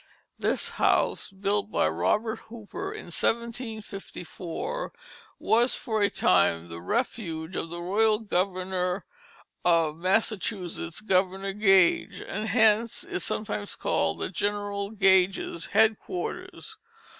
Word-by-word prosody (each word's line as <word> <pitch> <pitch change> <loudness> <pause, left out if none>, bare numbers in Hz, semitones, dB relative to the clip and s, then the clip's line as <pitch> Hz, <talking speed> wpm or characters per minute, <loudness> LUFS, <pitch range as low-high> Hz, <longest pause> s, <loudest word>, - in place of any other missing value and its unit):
This - - 0
house, - - +2
built 200 +1 -1
by - - +2
Robert 150 - 0
Hooper 220 -3 -6
in - - -7
1754, 220 - -4 0.5
was 240 +2 +3
for 220 -2 -2
a 200 - +4
time 85 -1 +2
the 85 0 -7
refuge 165 - -2
of 165 - -2
the 170 +1 -6
royal 210 +4 +3
governor 185 -2 -1 0.6
of 165 -3 +3
Massachusetts 185 -2 -1
Governor 195 -1 +1
Gage; 195 -4 +4
and 215 +2 -4
hence 220 +1 +3
is 180 - -4
sometimes 105 - -3
called 80 - 0
General 205 0 -2
Gage's 190 -4 +2
Headquarters. 220 - -1
195 Hz, 105 wpm, -27 LUFS, 175-220 Hz, 0.6 s, a